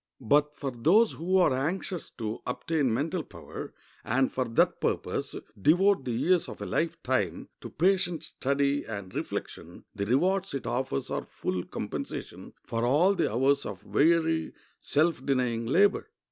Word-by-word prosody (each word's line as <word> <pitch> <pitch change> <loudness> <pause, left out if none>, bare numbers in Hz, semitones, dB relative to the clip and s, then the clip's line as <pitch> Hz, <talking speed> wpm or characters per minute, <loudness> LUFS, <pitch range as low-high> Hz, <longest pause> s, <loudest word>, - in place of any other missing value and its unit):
But 145 +4 +2
for 140 -2 -3
those 175 - +4
who 185 +4 0
are 175 -7 +4
anxious 170 +6 -2
to 110 -2 -3
obtain 140 +1 0
mental 155 +9 -1
power, - - -9 0.3
and 130 +3 +1
for 130 - 0
that 115 -1 +2
purpose - - -2 0.3
devote 180 - +4
the 125 - -2
years 175 +9 +2
of - - -9
a - - -4
life 165 +1 -1
time 105 -10 -1
to - - -8
patient 180 0 +1
study 140 +1 0
and 100 -4 -7
reflection, - - -5
the 100 - -3
rewards 185 - +1
it 135 - -4
offers 125 - -2
are - - -1
full 90 -1 -4
compensation - - -6
for 115 0 -2
all 150 +11 +4
the - - 0
hours 135 +5 +2
of 100 0 -7
weary, 160 +1 +2 0.3
self 155 -2 +1
denying 125 -4 0
labor. 195 - +3
140 Hz, 155 wpm, -28 LUFS, 125-170 Hz, 0.3 s, those